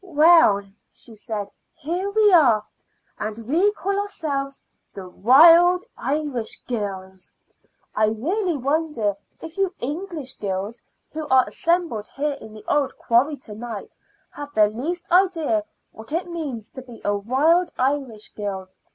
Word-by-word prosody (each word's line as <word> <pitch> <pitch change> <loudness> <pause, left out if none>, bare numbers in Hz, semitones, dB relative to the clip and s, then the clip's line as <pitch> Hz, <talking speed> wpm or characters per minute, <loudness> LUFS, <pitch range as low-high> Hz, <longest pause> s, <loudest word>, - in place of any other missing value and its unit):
"Well," 315 - +5 0.3
she 230 - -6
said, 210 -2 -5 0.2
"here 355 +7 -3
we 415 -1 +4
are, 240 -11 +5 0.5
and 215 0 -4
we 350 +9 +3
call 395 +1 -2
ourselves 280 -9 -4 0.3
the 190 -2 -8
Wild 330 - +6
Irish 280 -5 -2
Girls. 190 -5 -5 0.6
I 215 - +3
really 335 - -1
wonder 280 -6 -1 0.3
if 325 +3 -8
you 390 -2 +2
English 300 -1 -4
girls 200 +3 -4 0.3
who 310 -1 -5
are 260 -2 +5
assembled 335 -11 -1
here 290 +1 -1
in 220 - -11
the 215 0 -13
old 285 -2 0
quarry 265 +5 +2
to 210 - -9
night 220 -1 -7 0.4
have 290 0 -8
the 210 -1 +5
least 320 - -4
idea 330 - +2 0.3
what 220 +5 -9
it 340 +3 -1
means 290 -11 -5
to 260 - -9
be 245 -3 -13
a 205 - +1
wild 295 - +2
Irish 260 -5 -1
girl. 195 -3 -5
275 Hz, 140 wpm, -23 LUFS, 215-335 Hz, 0.6 s, Wild